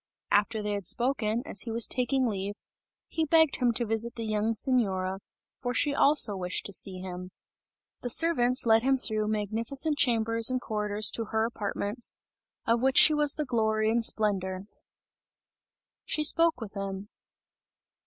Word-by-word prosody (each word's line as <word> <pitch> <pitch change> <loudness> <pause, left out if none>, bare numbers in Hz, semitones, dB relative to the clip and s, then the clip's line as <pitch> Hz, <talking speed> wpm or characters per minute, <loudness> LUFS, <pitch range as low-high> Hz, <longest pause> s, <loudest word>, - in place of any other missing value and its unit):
After 210 +1 +1
they 210 - -3
had 200 -3 -3
spoken, 240 -2 0
as 200 - -1
he 235 - -7
was 225 0 +2
taking 260 +1 -1
leave, 200 -2 -4 0.5
he 320 - -2
begged 320 -1 +3
him 245 -2 +1
to 235 +1 -2
visit 225 +2 -1
the 230 -1 -5
young 215 +1 -1
Signora, 195 -7 0 0.4
for 245 -1 -3
she 290 +4 +1
also 280 -7 +4
wished 180 -1 -3
to 200 - -5
see 185 0 0
him. 180 -1 -8 0.7
The 245 - -4
servants 250 -4 +3
led 225 -1 +4
him 265 +2 +1
through 215 -4 -2
magnificent 230 +8 -1
chambers 230 -2 +2
and 255 0 -1
corridors 210 -2 0
to 230 - -3
her 220 +1 -1
apartments, 215 0 -3 0.5
of 230 +1 +1
which 265 +1 +1
she 310 - +8
was 295 -1 +3
the 300 - -3
glory 220 -3 0
and 235 0 0
splendour. 190 -4 -1 1.4
She 305 - -1
spoke 330 -1 +2
with 220 -4 -9
him! 195 0 -6
225 Hz, 160 wpm, -27 LUFS, 210-255 Hz, 1.4 s, she